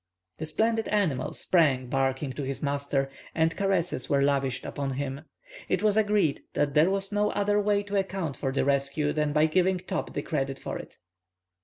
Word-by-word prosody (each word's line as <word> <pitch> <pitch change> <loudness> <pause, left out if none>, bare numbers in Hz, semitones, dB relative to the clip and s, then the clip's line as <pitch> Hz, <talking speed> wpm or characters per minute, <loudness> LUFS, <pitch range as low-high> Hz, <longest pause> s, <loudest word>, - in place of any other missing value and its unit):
The 155 - -3
splendid 225 +7 +1
animal 170 -12 0
sprang, 145 -8 +2
barking, 135 +1 -1
to 145 - -5
his 135 +1 -4
master, 140 -1 0 0.3
and 160 0 +2
caresses 195 -4 0
were 140 -2 +3
lavished 135 -2 0
upon 140 -1 -3
him. 140 +2 -4 0.4
It - - +1
was 210 -1 +4
agreed 210 -8 +2
that 145 -1 +1
there 155 +4 +5
was 195 0 -1
no 210 0 +2
other 205 +1 +2
way 205 0 +2
to 205 0 -2
account 190 -7 -3
for 135 - -2
the 135 - 0
rescue 140 +2 +1
than 150 -1 0
by 150 +1 +4
giving 185 +3 +2
Top 185 +2 -4
the - - -2
credit 135 -3 -3
of - - -3
it. - - -11
155 Hz, 185 wpm, -27 LUFS, 140-195 Hz, 0.4 s, there